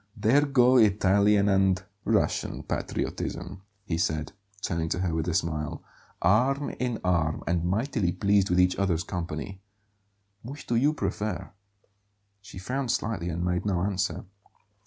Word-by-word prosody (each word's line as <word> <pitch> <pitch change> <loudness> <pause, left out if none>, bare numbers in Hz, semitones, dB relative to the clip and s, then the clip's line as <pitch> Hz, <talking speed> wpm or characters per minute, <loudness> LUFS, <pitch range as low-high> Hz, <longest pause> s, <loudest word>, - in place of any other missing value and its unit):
"There 125 +8 +3
go 130 -2 +5
Italian 100 -1 +4
and 95 -2 +2 0.2
Russian - - 0
patriotism," 95 - -4 0.2
he 85 -4 -2
said, 80 -3 -1 0.3
turning 80 -2 -1
to 90 - -1
her 90 -3 -1
with 80 +1 -1
a 85 - 0
smile; 80 -3 -2 0.4
"arm 130 +10 +2
in 125 -2 -1
arm 85 -4 0
and 85 0 0
mightily 105 +1 0
pleased 100 +1 +2
with 90 +1 +2
each 90 0 +4
other's 90 -4 0
company. 90 +2 -5 0.8
Which 140 +5 -9
do - - -2
you 145 +6 +3
prefer?" 105 -8 -3 0.9
She 100 - -12
frowned 125 +7 -3
slightly 110 -7 -1
and 85 +1 -2
made 90 0 0
no 95 -4 0
answer. 100 +1 -2
95 Hz, 140 wpm, -27 LUFS, 85-110 Hz, 0.9 s, go